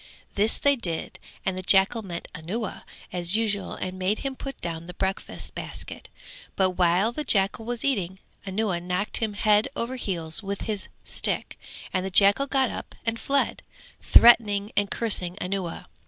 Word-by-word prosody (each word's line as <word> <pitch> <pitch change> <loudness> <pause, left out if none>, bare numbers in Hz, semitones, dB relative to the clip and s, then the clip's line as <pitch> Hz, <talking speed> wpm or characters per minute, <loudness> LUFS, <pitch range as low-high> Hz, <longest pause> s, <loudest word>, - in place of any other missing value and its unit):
This 210 +3 +4
they 285 0 +3
did 170 -10 -4 0.3
and 190 - 0
the 185 - -4
jackal 195 +5 +3
met 175 -5 -7
Anuwa 185 +7 -5 0.3
as 175 +3 +3
usual 205 -3 -1
and 185 0 -5
made 190 +3 +1
him 270 -1 -2
put 275 0 -7
down 170 -1 -5
the 180 - -9
breakfast 190 0 -3
basket, - - -7 0.5
but 190 -1 +2
while 180 +4 +2
the 300 +5 -4
jackal 210 -3 +2
was 240 +1 -3
eating, 190 -9 -1 0.3
Anuwa 195 -2 -1
knocked 180 +4 0
him 220 -2 -1
head 210 +2 +3
over 255 0 -3
heels 170 -7 -1
with 200 -1 -5
his 210 -3 -2 0.2
stick; - - 0 0.4
and 185 - 0
the 190 - -3
jackal 200 +8 +4
got 265 -2 +1
up - - -8
and 225 0 -1
fled, 275 0 0 0.4
threatening 210 -3 +5
and 205 -1 +1
cursing 190 -6 +2
Anuwa. 185 -2 -4
200 Hz, 165 wpm, -25 LUFS, 185-225 Hz, 0.5 s, threatening